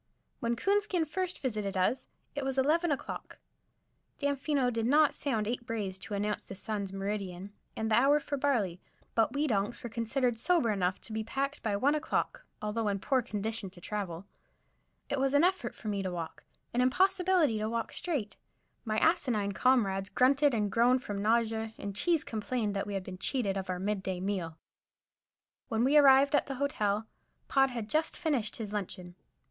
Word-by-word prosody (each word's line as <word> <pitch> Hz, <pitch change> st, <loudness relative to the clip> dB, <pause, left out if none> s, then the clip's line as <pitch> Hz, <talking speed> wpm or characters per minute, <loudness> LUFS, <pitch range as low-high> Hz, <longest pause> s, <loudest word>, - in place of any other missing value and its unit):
When 235 Hz, 0 st, 0 dB
Coonskin 395 Hz, -, +1 dB
first 365 Hz, +4 st, -3 dB
visited 210 Hz, -7 st, -2 dB
us 185 Hz, +8 st, +1 dB, 0.3 s
it 285 Hz, -, -3 dB
was 270 Hz, 0 st, -2 dB
eleven 320 Hz, +6 st, +3 dB
o'clock. 280 Hz, -, -4 dB, 0.8 s
Damfino 280 Hz, -2 st, +1 dB
did 225 Hz, 0 st, 0 dB
not 295 Hz, +2 st, +5 dB
sound 220 Hz, -7 st, -1 dB
eight 240 Hz, +1 st, -2 dB
brays 210 Hz, -6 st, -3 dB
to 205 Hz, -, -5 dB
announce 210 Hz, +1 st, -2 dB
the 195 Hz, -, -7 dB
sun's 200 Hz, -1 st, -4 dB
meridian 195 Hz, -1 st, -4 dB, 0.2 s
and 220 Hz, 0 st, -1 dB
the -, -, +6 dB
hour 275 Hz, +5 st, +5 dB
for 290 Hz, 0 st, -3 dB
barley, 230 Hz, -11 st, 0 dB, 0.3 s
but 225 Hz, -1 st, +2 dB
we 290 Hz, +2 st, +1 dB
donks 230 Hz, +2 st, -1 dB
were 240 Hz, -, -5 dB
considered 240 Hz, +1 st, 0 dB
sober 330 Hz, -6 st, +2 dB
enough 185 Hz, -2 st, 0 dB
to 220 Hz, -, -4 dB
be 220 Hz, 0 st, -1 dB
packed 275 Hz, +5 st, -2 dB
by 210 Hz, -2 st, 0 dB
one 270 Hz, +8 st, +3 dB
o'clock, 305 Hz, -, -2 dB, 0.2 s
although 210 Hz, +1 st, -1 dB
in 200 Hz, -1 st, +1 dB
poor 260 Hz, +6 st, +1 dB
condition 220 Hz, -2 st, -4 dB
to 180 Hz, -1 st, -13 dB
travel. 190 Hz, -2 st, -4 dB, 0.8 s
It 280 Hz, -, -1 dB
was 270 Hz, +1 st, +2 dB
an 285 Hz, -, +5 dB
effort 370 Hz, +2 st, +1 dB
for 220 Hz, -, -9 dB
me 200 Hz, -2 st, -1 dB
to 190 Hz, -1 st, -2 dB
walk, 170 Hz, -2 st, -6 dB, 0.3 s
an 245 Hz, -, +2 dB
impossibility 365 Hz, -, +3 dB
to 215 Hz, +1 st, -1 dB
walk 230 Hz, 0 st, -3 dB
straight. 280 Hz, -, -3 dB, 0.5 s
My 215 Hz, -2 st, -1 dB
asinine 245 Hz, -, +2 dB
comrades 195 Hz, -4 st, +2 dB
grunted 275 Hz, +1 st, +4 dB
and 210 Hz, -2 st, 0 dB
groaned 245 Hz, +3 st, +3 dB
from 205 Hz, -5 st, -4 dB
nausea, 225 Hz, 0 st, +1 dB
and 200 Hz, -1 st, -5 dB
Cheese 330 Hz, -, +2 dB
complained 215 Hz, -1 st, -2 dB
that 195 Hz, -, -2 dB
we 205 Hz, -, -3 dB
had 195 Hz, -, -2 dB
been 185 Hz, 0 st, -8 dB
cheated 205 Hz, -4 st, -1 dB
of 190 Hz, -1 st, -4 dB
our 180 Hz, -, -1 dB
mid 200 Hz, +2 st, -1 dB
day 190 Hz, -1 st, -3 dB
meal. 180 Hz, -4 st, -3 dB, 1.1 s
When 225 Hz, 0 st, 0 dB
we 275 Hz, +4 st, +3 dB
arrived 280 Hz, -1 st, +7 dB
at 290 Hz, -, +3 dB
the 270 Hz, -, -4 dB
Hotel, 220 Hz, -6 st, 0 dB, 0.4 s
Pod 270 Hz, -1 st, +4 dB
had 235 Hz, -4 st, -4 dB
just 310 Hz, +7 st, 0 dB
finished 280 Hz, -10 st, 0 dB
his 215 Hz, -2 st, -6 dB
luncheon. 180 Hz, -3 st, -5 dB
230 Hz, 185 wpm, -31 LUFS, 200-275 Hz, 1.1 s, arrived